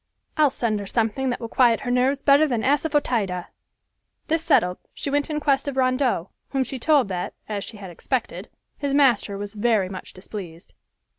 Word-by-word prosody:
I'll 305 -2 +4
send 225 -4 -1
her 200 - -6
something 230 +5 0
that 245 - -2
will 230 - -5
quiet 235 -1 +3
her 250 -3 -2
nerves 265 +3 +1
better 285 +2 +5
than 240 -5 -1
assafœtida!" 255 - 0 0.8
This 325 +1 +1
settled, 180 - +2 0.2
she 280 - -3
went 285 +1 0
in 300 -1 -1
quest 280 -1 +1
of 275 -2 -3
Rondeau, 255 -8 +1 0.2
whom 270 -1 0
she 260 0 -6
told 290 -2 +3
that, 180 -2 -4
as 205 -2 -3
she 220 - -8
had 195 -3 -9
expected, 245 +8 -3 0.3
his 280 -1 -1
master 240 -8 +3
was 205 +1 -6
very 210 -3 +1
much 190 -1 -8
displeased. 185 -3 -9
250 Hz, 180 wpm, -24 LUFS, 205-280 Hz, 0.8 s, better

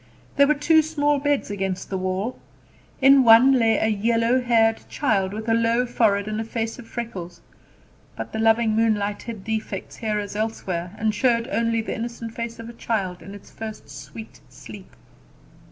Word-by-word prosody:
There 280 0 +5
were 300 - +3
two 315 +2 +4
small 295 -2 0
beds 285 -5 0
against 190 -2 -4
the 190 - -1
wall. 185 +6 -3 0.6
In 270 0 +7
one 235 +3 +7
lay 225 -1 +3
a - - +1
yellow 230 +3 +1
haired 225 -2 +2
child, 195 -9 0
with 220 +2 -6
a 225 - +2
low 230 +2 +2
forehead 215 -4 +1
and 215 +1 -2
a - - -3
face 225 +1 -4
of 235 - -11
freckles; 180 -9 -6 0.8
but - - -7
the 220 - -3
loving 225 0 +3
moonlight 210 -2 0
hid 225 -5 -8
defects 220 -3 -4
here 215 -2 -2
as 205 0 -5
elsewhere, 190 -4 -3
and 220 0 0
showed 230 +1 +1
only 230 -2 +1
the 220 - -4
innocent 230 0 -6
face 230 0 -5
of 230 0 -9
a 235 - -9
child 195 -6 -3
in 195 +4 -10
its 205 - -14
first 220 -8 -8
sweet 140 +10 -10
sleep. - - -12
225 Hz, 180 wpm, -23 LUFS, 205-235 Hz, 0.8 s, In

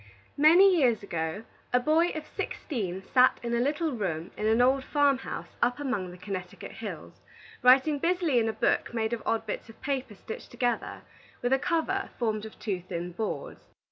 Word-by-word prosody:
Many 355 +6 +7
years 240 -9 +3
ago, 165 +1 -3 0.3
a 250 - +4
boy 310 +6 +3
of 310 -1 -5
sixteen 190 - -4
sat 255 +5 +4
in 235 0 -2
a 235 - +2
little 300 +5 0
room 180 - -3
in 215 - -1
an 220 +2 +3
old 260 +2 +4
farm 285 -2 +2
house - - -7
up 245 +3 +2
among 245 -10 -2
the 180 - -11
Connecticut 185 -1 -6
hills, - - -8 0.4
writing 265 +4 +5
busily 335 -5 +2
in 225 -1 +1
a - - +1
book 235 - 0
made 220 0 0
of 230 - -2
odd 225 - 0
bits - - -5
of 225 - -14
paper 265 -6 -3
stitched 220 - -8
together, 240 -1 -2 0.4
with 245 +2 +2
a 265 - +3
cover 345 +5 0
formed 220 -2 -1
of 220 - -14
two 195 -5 -3
thin 175 0 -5
boards. 220 - -5
240 Hz, 185 wpm, -28 LUFS, 210-285 Hz, 0.4 s, Many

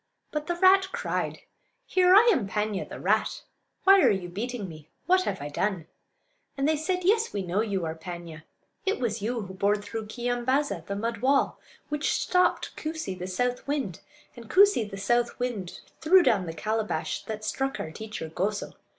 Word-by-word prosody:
But 300 0 -3
the 345 - 0
rat 380 +2 +5
cried: - - -3 0.4
"Here! 370 0 +5
I 440 +4 +7
am 240 - -1
Paan'ya, 210 0 -2
the - - -8
rat. - - 0 0.4
Why 390 0 +7
are - - +6
you 185 -3 -1
beating 215 +3 -4
me? 155 -3 -12 0.2
What 370 +1 +3
have - - -3
I - - -4
done?" 185 +2 -1 0.7
And 275 +1 +1
they 315 - +3
said: 360 +4 -1
"Yes, 440 +5 +2
we 200 - -2
know 185 +3 0
you 200 -6 -1
are 160 - -2
Paanya; 170 -1 -8 0.4
it 395 -7 0
was 230 -4 -1
you 235 +3 -1
who 190 -2 -8
bored 200 +2 +1
through 220 +1 -5
Keeyambaaza, 245 - -1
the 200 - -3
mud 230 +3 -2
wall; 270 +4 +2 0.3
which 295 +1 0
stopped 365 0 +1
Koosee, 315 -9 -4
the 180 0 -6
south 245 +8 -2
wind; 275 - -2 0.4
and 235 -2 -12
Koosee, 390 - +5
the 195 - -7
south 240 +4 +1
wind, 230 -8 -4 0.2
threw 360 +3 +6
down 195 - +2
the 165 - -4
calabash 215 0 -2
that 215 -1 -5
struck 270 +6 -2
our 160 - -4
teacher 215 -2 -6
Goso. 200 +6 -2
225 Hz, 185 wpm, -27 LUFS, 195-295 Hz, 0.7 s, I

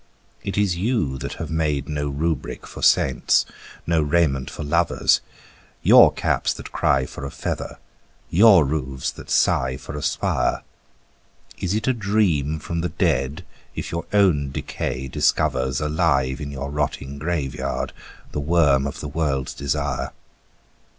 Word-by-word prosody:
It 100 - -4
is 100 -4 +2
you 90 - 0
that - - -4
have - - -6
made 75 -4 0
no 75 -1 -2
rubric 80 +3 -3
for - - -10
saints, 65 -2 +3 0.4
no 85 -1 +2
raiment 75 -4 +1
for - - -6
lovers, 85 +3 +2 0.6
Your - - +8
caps - - 0
that - - -10
cry 65 -1 +2
for 65 - -9
a 70 - -3
feather, - - -4 0.5
your 95 -3 +7
roofs 70 -2 -2
that - - -12
sigh 65 0 +2
for 70 - -8
a 75 - -4
spire: 70 -2 0 1.0
Is 95 +2 -1
it 110 +2 -2
a 130 - +4
dream 100 - +1
from 85 +2 -4
the 90 - -1
dead 70 +7 0 0.3
if - - -5
your 85 0 -3
own 90 -9 +3
decay 65 0 -4
discovers 65 0 +1
Alive 70 -3 +1
in 70 - -4
your 70 0 -5
rotting 70 -1 -3
graveyard 75 -3 -2 0.4
the - - -3
worm 70 -3 +3
of 70 - -6
the 75 - -4
world's 70 -3 -1
desire? 70 0 -2
75 Hz, 145 wpm, -23 LUFS, 70-85 Hz, 1.0 s, Your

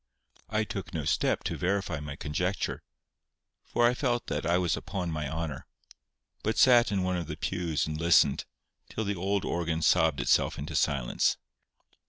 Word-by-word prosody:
I - - +1
took - - -6
no - - -2
step - - +1
to - - -2
verify 90 -3 -1
my 75 -1 -6
conjecture, 90 +7 -2 0.8
for 120 - +1
I 120 - +4
felt 120 -2 -1
that 75 +1 -2
I 85 +1 +3
was 90 -2 +1
upon 90 -3 -4
my 75 -1 -3
honour, 80 -4 -4 0.7
but 110 - -1
sat 120 -3 +6
in 95 -2 0
one 90 0 0
of 85 -3 -4
the 75 - -5
pews 85 -5 -1
and 75 0 -4
listened, 85 -4 +4 0.4
till 110 - -3
the 100 -1 -1
old 95 +2 -1
organ 85 -2 -1
sobbed - - +3
itself - - +2
into 75 +2 -5
silence. 70 -5 +1
85 Hz, 170 wpm, -29 LUFS, 75-100 Hz, 0.8 s, sat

